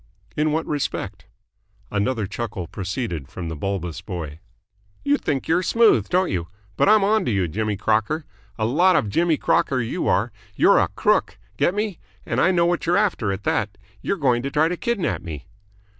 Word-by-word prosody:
"In 155 +1 +1
what 160 +2 0
respect?" 145 -2 -3 0.6
Another 105 +2 0
chuckle 105 -2 -5
proceeded 95 - -4
from 85 +2 -6
the 80 - -4
bulbous 90 0 -3
boy. 80 -6 -6 0.7
"You 285 0 +4
think 135 -2 -2
you're 170 +3 +3
smooth, 210 - +3
don't 185 +1 +2
you? 85 -3 -2 0.3
But - - +3
I'm 215 -1 +6
onto 210 -8 +2
you, 95 -5 +1
Jimmy 105 +5 -2
Crocker. 110 +10 0 0.3
A 110 - 0
lot 175 +11 +4
of 105 - +1
Jimmy 165 +4 +2
Crocker 130 - +1
you 125 +9 -2
are. 115 +5 +2 0.2
You're - - +5
a - - +3
crook. - - +1 0.2
Get 180 - +1
me? 210 -4 -2 0.3
And - - 0
I - - +4
know 175 -2 +3
what 175 -1 0
you're 175 +2 +3
after, 175 - +1
at 95 +1 -4
that. 100 -2 -1 0.2
You're 200 - -1
going 125 -5 +2
to 135 - -3
try 155 +3 +2
to 180 - -1
kidnap 215 0 -1
me." 75 -5 -7
125 Hz, 185 wpm, -23 LUFS, -, 0.7 s, I'm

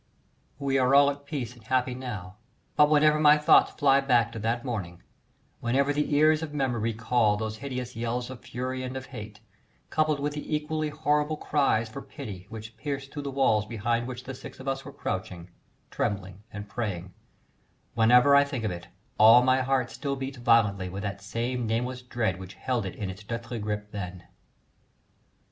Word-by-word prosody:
We 135 -1 +1
are 130 +1 +4
all 140 0 +7
at 140 0 -11
peace 130 -6 -4
and 120 -3 -18
happy 125 +2 0
now, 105 -7 -7 0.4
but 150 0 +6
whenever 150 0 +4
my 150 0 +7
thoughts 150 - +5
fly 140 -2 +4
back 120 -4 +3
to 115 - -6
that 115 +3 -1
morning, 95 -9 -5 0.6
whenever 135 +4 +1
the 150 0 0
ears 155 +1 +4
of 150 -2 -5
memory 120 -5 0
recall 110 -1 +2
those 110 0 -4
hideous 125 -2 -5
yells 120 +2 -2
of 130 - -8
fury 130 +2 -4
and 130 +1 -4
of 130 - -7
hate, 105 0 -8 0.5
coupled 155 -2 +1
with 145 +1 -2
the 150 +1 -3
equally 155 0 -2
horrible 150 0 0
cries 135 -7 +1
for 110 - -8
pity 95 -3 -9
which 110 0 -9
pierced 140 +2 -5
through 145 - -4
the 140 - -4
walls 120 -6 +2
behind 115 +2 -1
which 125 0 -6
the 135 - -6
six 130 - -10
of 130 - -9
us 135 0 -1
were 140 - -9
crouching, 90 -6 -5 0.4
trembling, 95 -1 -3
and 105 0 -7
praying, 100 -5 -4 0.8
whenever 125 +5 +6
I 140 - +7
think 135 -5 -4
of 105 - 0
it 85 -1 -7 0.3
all 115 +3 +8
my 130 +1 +3
heart 130 -1 0
still 140 -2 -3
beats 135 -1 -6
violently 105 -6 +3
with 100 +2 -6
that 100 -1 -4
same 115 +3 -2
nameless 125 +3 -1
dread 115 -7 -2
which 95 +1 -9
held 120 -6 -2
it 95 - -7
in 100 -3 -4
its 100 +3 -11
deathly 115 +2 -5
grip 105 0 -4
then. 90 -3 -6
125 Hz, 185 wpm, -27 LUFS, 110-140 Hz, 0.8 s, all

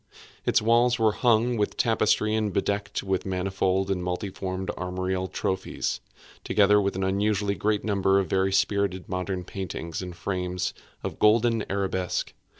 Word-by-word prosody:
Its - - +3
walls 120 +2 +4
were 110 -2 +3
hung 120 +1 +2
with 105 - -1
tapestry 110 -1 +2
and 110 -2 0
bedecked 100 +2 -1
with 95 -1 -1
manifold 95 0 0
and 90 -2 -1
multiform 95 +1 -3
armorial 95 0 -2
trophies, 95 0 -2 0.4
together 105 0 +4
with 100 -1 -1
an 95 - -1
unusually 100 +1 +1
great 105 +1 0
number 100 -2 +2
of 100 - +2
very 95 +1 +1
spirited 100 -1 +1
modern 90 0 -3
paintings 90 -3 -5
in 90 -1 -5
frames 90 +1 -3 0.3
of - - -2
rich - - -18
golden 115 0 +3
arabesque. 95 -2 -1
95 Hz, 150 wpm, -26 LUFS, 95-105 Hz, 0.4 s, walls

